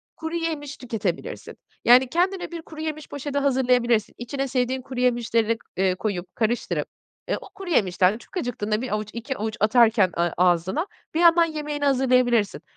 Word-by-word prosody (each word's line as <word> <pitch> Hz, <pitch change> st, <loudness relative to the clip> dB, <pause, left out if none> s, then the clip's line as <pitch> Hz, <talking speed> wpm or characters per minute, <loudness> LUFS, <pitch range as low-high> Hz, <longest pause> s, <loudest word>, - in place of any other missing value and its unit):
kuruyemiş 320 Hz, -3 st, -4 dB
tüketebilirsin. 215 Hz, -8 st, -4 dB, 0.3 s
Yani, 250 Hz, +2 st, +7 dB
kendine 360 Hz, +5 st, 0 dB
bir 335 Hz, -1 st, -6 dB
kuruyemiş 310 Hz, -1 st, -6 dB
poşeti 285 Hz, 0 st, -4 dB
hazırlayabilirsin. 250 Hz, -5 st, +2 dB
İçine 270 Hz, +3 st, -3 dB
sevdiğin 255 Hz, 0 st, -1 dB
kuruyemişleri, 240 Hz, -3 st, 0 dB, 0.2 s
eee, 190 Hz, -1 st, +2 dB
koyup, 185 Hz, -2 st, -4 dB
karıştırıp, 235 Hz, +1 st, -1 dB, 0.4 s
eee, -, -, 0 dB
o -, -, -12 dB
kuruyemişten 210 Hz, -, +1 dB
çok 240 Hz, -, -10 dB
acıktığında 220 Hz, -6 st, -2 dB
1 255 Hz, -, -3 dB
avuç, 210 Hz, 0 st, -2 dB
2 240 Hz, +3 st, -4 dB
avuç 220 Hz, +1 st, -3 dB
atarken 220 Hz, -2 st, +4 dB
ağ 170 Hz, 0 st, +2 dB
ağzına, 180 Hz, -, +2 dB, 0.3 s
bir 320 Hz, -, 0 dB
yandan 340 Hz, 0 st, +6 dB
yemeğini 300 Hz, -2 st, -3 dB
hazırlayabilirsin. 250 Hz, -5 st, +2 dB
250 Hz, 140 wpm, -24 LUFS, 215-290 Hz, 0.4 s, Yani